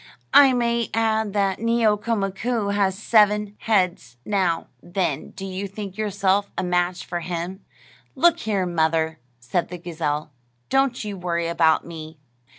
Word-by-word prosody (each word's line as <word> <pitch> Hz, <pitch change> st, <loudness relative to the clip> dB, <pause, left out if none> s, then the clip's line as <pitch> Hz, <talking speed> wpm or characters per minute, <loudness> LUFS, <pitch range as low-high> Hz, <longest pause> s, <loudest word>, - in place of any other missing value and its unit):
I 275 Hz, -2 st, +8 dB
may 235 Hz, -1 st, 0 dB
add 220 Hz, -2 st, +1 dB
that 195 Hz, -2 st, +1 dB
Neeoka 230 Hz, -1 st, +2 dB
Mkoo 200 Hz, +2 st, -1 dB
has 195 Hz, -2 st, +1 dB
seven 210 Hz, -1 st, +3 dB
heads. 180 Hz, -, 0 dB
Now, 185 Hz, -5 st, 0 dB, 0.2 s
then, 175 Hz, -5 st, -2 dB
do 195 Hz, -, -8 dB
you 190 Hz, +1 st, -4 dB
think 195 Hz, -1 st, -7 dB
yourself 200 Hz, -1 st, +1 dB
a -, -, 0 dB
match 180 Hz, 0 st, 0 dB
for 175 Hz, -, -3 dB
him?" 175 Hz, +3 st, -5 dB, 0.5 s
"Look 340 Hz, 0 st, +4 dB
here, 205 Hz, -, 0 dB
mother," 160 Hz, -2 st, 0 dB, 0.2 s
said 125 Hz, +9 st, -2 dB
the 180 Hz, -, -6 dB
gazelle, 155 Hz, -3 st, -3 dB, 0.4 s
"don't 270 Hz, -3 st, +1 dB
you 205 Hz, -2 st, -5 dB
worry 170 Hz, -2 st, -1 dB
about 165 Hz, -1 st, +3 dB
me. 160 Hz, -1 st, -9 dB
195 Hz, 145 wpm, -23 LUFS, 175-215 Hz, 0.5 s, I